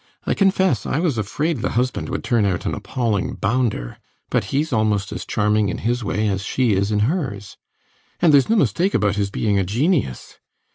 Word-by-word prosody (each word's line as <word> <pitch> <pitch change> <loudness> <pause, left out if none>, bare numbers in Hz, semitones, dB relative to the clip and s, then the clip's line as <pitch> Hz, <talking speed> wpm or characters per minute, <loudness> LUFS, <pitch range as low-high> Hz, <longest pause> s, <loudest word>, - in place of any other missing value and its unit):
I - - +1
confess 190 - +2
I - - -1
was 155 -8 0
afraid 145 +10 -1
the 115 - -2
husband 125 +1 -1
would - - -3
turn 115 -3 +2
out 95 -4 -1
an - - -1
appalling 115 -6 -2
bounder. 105 - -1 0.3
But - - +1
he's 150 +1 -1
almost 105 -3 +1
as - - -6
charming 105 -1 +1
in - - -3
his 120 +1 -1
way 105 +1 -1
as 95 -1 -1
she 120 +1 +1
is 100 +2 0
in 105 -1 +1
hers. 120 - -2 0.6
And 165 -3 +4
theres 140 +4 +5
no 225 - +4
mistake 195 -2 +1
about 100 -1 +1
his 100 -1 0
being 100 0 0
a - - +2
genius. 120 - -1
110 Hz, 195 wpm, -21 LUFS, 100-140 Hz, 0.6 s, theres